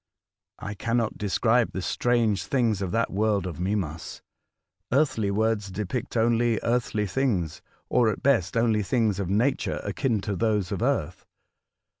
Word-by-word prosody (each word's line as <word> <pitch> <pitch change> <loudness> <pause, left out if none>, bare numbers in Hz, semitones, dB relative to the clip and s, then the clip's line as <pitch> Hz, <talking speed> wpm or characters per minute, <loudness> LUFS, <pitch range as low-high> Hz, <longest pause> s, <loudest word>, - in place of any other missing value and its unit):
I 105 - -6
cannot 115 +2 -1
describe 115 +3 +2
the 95 - -3
strange 115 -5 +1
things 115 -7 +1
of 95 - -2
that 115 +4 0
world 105 -2 +1
of 85 -2 -5
Mimas. 90 -4 -3 0.7
Earthly 125 -7 +2
words 105 0 0
depict 105 +5 -4
only 115 0 +2
earthly 115 -3 0
things, 95 - -1 0.3
or 120 -3 +3
at 105 - -4
best 115 -8 +2
only 115 -2 +2
things 105 -1 +1
of 95 -3 -2
nature 115 +8 +1
akin 120 -6 0
to 100 0 -3
those 105 -3 0
of - - -3
earth. - - -1
110 Hz, 145 wpm, -26 LUFS, 100-120 Hz, 0.7 s, or